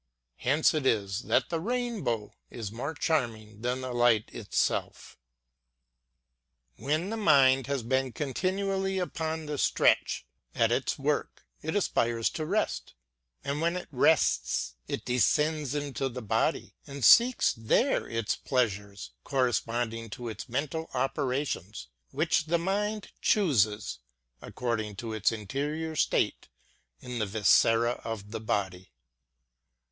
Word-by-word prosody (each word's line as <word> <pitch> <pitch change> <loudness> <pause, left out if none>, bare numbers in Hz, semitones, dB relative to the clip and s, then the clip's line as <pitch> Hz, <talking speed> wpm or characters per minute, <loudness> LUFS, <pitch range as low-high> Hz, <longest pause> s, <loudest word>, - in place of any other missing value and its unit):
Hence 145 - +3
it 150 -4 0
is 100 -2 0
that - - +2
the 165 - -1
rainbow 210 - -2 0.2
is 110 -4 -6
more 140 +8 -4
charm 130 -6 +1
ing 110 -1 -15
than 125 +2 -1
the 130 -1 -4
light 120 -3 +2
itself. - - -2 1.6
When 155 +8 -1
the 225 - -2
mind 135 - +4
has 140 -3 -1
been 130 +2 0
continually 190 +7 -1
upon 160 -3 -3
the 150 -2 -4
stretch, - - +2 0.3
at - - +3
its - - 0
work, - - -2 0.2
it - - -3
aspires 115 -1 +1
to 155 -1 -4
rest; 205 - -1 0.5
and 140 +2 -2
when 170 +1 +1
it 180 - -7
rests 60 - +2
it - - -4
descends 150 +4 +1
into 140 -2 -2
the 125 -1 -7
body, 105 - 0
and 140 -3 -3
seeks 240 - +6
there 115 - +1
its 115 -2 -1
pleasures, 100 - -2
correspondent 115 -3 -1
to 120 -1 -6
its 110 +4 -7
mental 150 +6 -3
operations, 130 - -2 0.2
ŌĆö - - -35
which 160 +1 +2
the 170 +2 +2
mind 205 +4 -2
chooses, 110 - +2 0.4
according 110 -4 -3
to 115 +2 -5
its 110 0 +2
interior 145 +9 -3
state 150 - 0 0.5
in 125 -1 -5
the 110 - 0
viscera 115 +3 +3
of 105 -2 -6
the 115 - -4
body. 95 -4 -2
130 Hz, 130 wpm, -29 LUFS, 110-155 Hz, 1.6 s, seeks